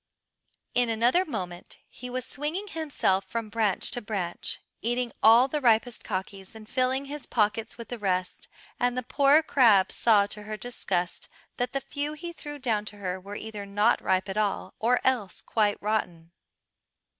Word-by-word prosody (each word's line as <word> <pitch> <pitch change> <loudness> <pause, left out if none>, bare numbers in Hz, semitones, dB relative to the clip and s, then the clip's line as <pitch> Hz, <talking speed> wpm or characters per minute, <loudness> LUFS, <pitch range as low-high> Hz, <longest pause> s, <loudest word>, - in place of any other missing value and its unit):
In 245 -1 +3
another 240 +11 +3
moment 180 - -6
he 250 - -9
was 255 0 -3
swinging 310 +11 -3
himself 290 - 0
from 230 0 -4
branch 215 -3 0
to 245 - -1
branch, 195 -5 -3 0.2
eating 240 +1 -1
all 230 +4 +7
the 295 +2 -2
ripest 235 -1 +3
kakis 190 0 -5
and 215 -1 -11
filling 260 +2 0
his 290 0 -6
pockets 215 0 0
with 235 - -9
the 245 - -5
rest, 185 -2 -1 0.3
and 245 0 +1
the 255 - -1
poor 280 +5 +4
crab 230 -11 +5
saw 210 -4 +4
to 210 +1 -9
her 215 +1 -6
disgust 180 -7 -2 0.3
that 245 +2 -1
the 275 - -1
few 290 +2 -3
he 340 +3 -7
threw 295 -3 -8
down 225 -6 0
to 210 - -8
her 185 -2 -3
were 200 +2 -8
either 215 -1 -6
not 205 +4 +2
ripe 190 +1 +1
at 195 +1 -4
all 210 -2 -1
or 245 +3 +3
else 240 -7 +1
quite 210 -2 +1
rotten. 175 -6 -2
225 Hz, 170 wpm, -27 LUFS, 205-255 Hz, 0.3 s, all